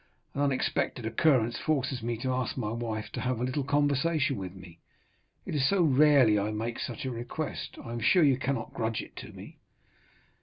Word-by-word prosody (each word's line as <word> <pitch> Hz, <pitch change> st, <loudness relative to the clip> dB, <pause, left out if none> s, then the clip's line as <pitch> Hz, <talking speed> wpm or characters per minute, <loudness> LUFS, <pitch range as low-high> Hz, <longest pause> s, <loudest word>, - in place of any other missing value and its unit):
An 140 Hz, -, -2 dB
unexpected 130 Hz, -3 st, 0 dB
occurrence 120 Hz, 0 st, +2 dB
forces 135 Hz, -4 st, -1 dB
me 115 Hz, 0 st, -2 dB
to 130 Hz, -1 st, 0 dB
ask 125 Hz, 0 st, -2 dB
my 110 Hz, -4 st, -2 dB
wife 115 Hz, -2 st, -4 dB
to -, -, -4 dB
have 125 Hz, -2 st, -1 dB
a -, -, -1 dB
little 130 Hz, +3 st, -1 dB
conversation 145 Hz, +1 st, +1 dB
with 95 Hz, -2 st, -6 dB
me; 90 Hz, -3 st, -13 dB, 0.7 s
it -, -, -5 dB
is 140 Hz, -2 st, +2 dB
so 195 Hz, -3 st, +3 dB
rarely 140 Hz, -7 st, +5 dB
I 100 Hz, +1 st, -1 dB
make 110 Hz, +2 st, -3 dB
such 145 Hz, -, -4 dB
a 130 Hz, -, -2 dB
request, 120 Hz, +6 st, -5 dB
I 115 Hz, -, -6 dB
am 120 Hz, -, -3 dB
sure 175 Hz, +9 st, +4 dB
you 135 Hz, -3 st, +4 dB
cannot 135 Hz, +1 st, -2 dB
grudge 110 Hz, -1 st, -2 dB
it -, -, -15 dB
to -, -, -8 dB
me." -, -, -12 dB
130 Hz, 195 wpm, -29 LUFS, 115-145 Hz, 0.7 s, rarely